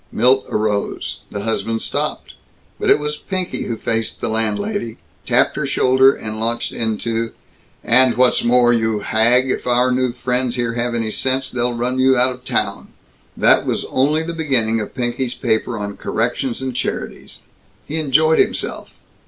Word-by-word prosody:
Milt 130 +2 +3
arose. 105 -1 -2
The 100 - -5
husband 115 +1 -2
stopped. - - -3 0.5
But - - 0
it - - +6
was 150 0 -3
Pinky 185 +1 -4
who 115 - -3
faced 115 0 -2
the - - -3
landlady, 115 - -2 0.3
tapped - - +3
her - - -1
shoulder, 130 +1 +4
and 110 -4 -6
launched 115 +1 -1
into, 115 +1 -2 0.5
"And 130 0 +5
what's 125 0 +3
more, 120 0 +4
you 110 -2 0
hag, 120 +5 +3
if - - -4
our 125 +1 +3
new 125 0 +1
friends 125 0 -1
here 120 -2 -1
have 120 0 -2
any 115 -2 -2
sense, 130 +3 0
they'll 120 -1 -1
run 125 +2 -2
you 130 0 +4
out 130 +1 +3
of 125 0 -15
town." - - -2 0.5
That - - +4
was - - -1
only 150 +4 +2
the 170 +1 -5
beginning 130 -9 +1
of 105 - -6
Pinky's 125 0 -2
paper 115 0 -1
on 100 -1 -5
corrections 120 +2 -2
and 130 -2 -4
charities. - - -5 0.5
He 155 - -4
enjoyed 155 +1 +3
himself. - - -1
120 Hz, 165 wpm, -19 LUFS, 115-130 Hz, 0.5 s, it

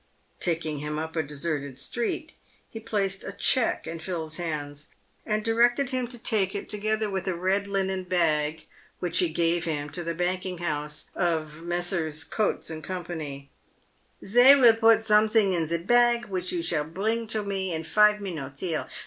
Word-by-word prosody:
Taking 160 -4 -1
him 150 +1 -4
up 160 +1 -5
a 160 - +2
deserted 145 -2 -4
street, 240 - -3 0.4
he 225 - -8
placed 200 -4 -2
a - - -5
cheque 255 -3 +2
in 165 0 -6
Phil's 160 -2 -4
hands, 150 -3 -5 0.4
and 215 0 -1
directed 240 +4 +3
him 255 -2 -1
to 245 0 -8
take 210 -4 0
it, 200 - -4
together 215 +1 -1
with 190 -2 -3
a 185 - 0
red 190 +3 0
linen 190 -1 -1
bag 160 -4 0 0.3
which 175 -2 -1
he 175 - +3
gave 170 +1 +1
him, 150 -3 -3
to 175 - -5
the 170 0 -3
banking 180 +1 -2
house 150 -2 -3
of 160 -3 -1
Messrs. 170 -3 -1
Coutts 215 -3 -1
and 155 0 -7
Co. 185 -1 -4 0.7
" - - -27
Sey 245 +7 +7
will 240 -3 +8
put 225 -1 +4
someting 215 -2 +4
in 165 -3 0
se 170 0 -1
bag, 240 +2 +4
which 185 -1 -2
you 175 -2 -2
shall 160 -3 0
bring 220 +8 -2
to 215 0 -1
me 195 -2 -2
in 160 -1 -3
five 210 +4 +4
minutes, 145 -9 -5
here. 165 -4 -2
180 Hz, 175 wpm, -26 LUFS, 160-215 Hz, 0.7 s, will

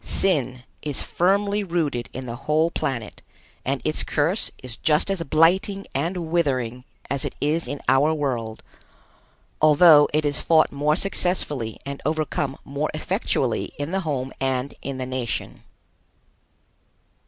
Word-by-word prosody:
Sin 130 -9 0 0.2
is 145 -3 -1
firmly 200 +3 +1
rooted 160 -10 -1
in 130 +1 -6
the 120 -1 -5
whole 155 +2 +3
planet 130 -10 -3 0.4
and 135 0 -2
its 155 - +1
curse 165 +8 +1
is 125 -2 -6
just 155 +5 +2
as 195 -3 -2
blighting 190 +6 +2
and 165 +3 -2
withering 130 -7 0 0.3
as 140 0 0
it 145 - -4
is 155 +2 0
in 140 +2 -4
our 135 +4 +4
world, 125 -8 -2 1.0
although 155 0 +7
it 155 0 +1
is 145 -1 0
fought 160 -1 +4
more 150 +2 +1
successfully 165 - 0
and 140 0 -6
overcome 155 -3 -1
more 140 +2 -2
effectually - - -1
in 145 +3 -4
the 195 - 0
home 140 -7 -3
and 130 0 -1
in 140 -1 -5
the 130 - -3
nation. 130 -2 -3
145 Hz, 140 wpm, -23 LUFS, 130-165 Hz, 1.0 s, although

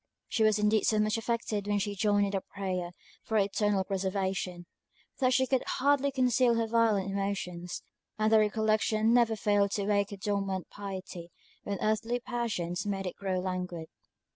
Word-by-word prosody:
She - - -1
was 215 -1 +4
indeed 210 0 +2
so 215 - +3
much 215 0 +2
affected 225 -3 -2
when 205 0 +1
she 205 0 -1
joined 205 0 +2
in 200 - -2
the 195 -1 -1
prayer 185 -3 -4 0.3
for 220 - -3
her 205 - +5
eternal 205 0 +1
preservation, 190 -2 -2 0.5
that 255 -2 +3
she 260 +1 +3
could 260 0 +1 0.2
hardly 280 +1 +3
conceal 250 -2 +3
her 230 0 +1
violent 220 -4 +2
emotions; 190 -3 -3 0.3
and 215 0 +2
the 220 - +7
recollection 215 +1 +2
never 235 -2 +4
failed 205 -1 +2
to 200 - -1
wake 200 -1 +1
her 200 - -7
dormant 195 -2 -2
piety 190 -3 -7 0.4
when 200 -1 -2
earthly 225 +3 0
passions 230 -8 -3
made 195 -1 -2
it 180 - -4
grow 190 -2 -2
languid. 180 -3 -4
205 Hz, 170 wpm, -30 LUFS, 195-220 Hz, 0.5 s, the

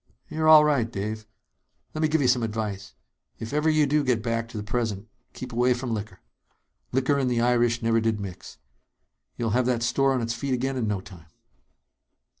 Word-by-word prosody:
"You're 155 0 -1
all 155 -1 +8
right, 130 -7 +1
Dave. 110 +1 -5 0.7
Let 155 - -4
me 155 - +3
give 155 -1 +1
you - - +3
some 125 0 +3
advice. 105 -3 -4 0.4
If 115 +4 -7
ever 150 +2 +2
you 155 -1 +3
do 150 +1 +1
get 125 -5 0
back 115 0 -1
to 115 - -8
the 105 - -4
present... 110 -2 -3 0.3
keep 125 -1 -8
away 125 +1 +2
from 125 -1 -4
liquor. 105 -3 -6 0.7
Liquor 135 +2 +1
and 130 -2 +1
the 120 -1 0
Irish 120 -1 +2
never 115 0 +2
did 110 -1 0
mix. 95 -3 -8 0.8
You'll 115 -2 -1
have 125 +2 +1
that 120 -2 0
store 135 +3 +2
on 130 - 0
its 115 0 -2
feet 130 +2 -2
again 135 +2 -2
in 120 -4 -1
no 100 -2 -1
time." 90 -4 -14
120 Hz, 200 wpm, -25 LUFS, 110-130 Hz, 0.8 s, all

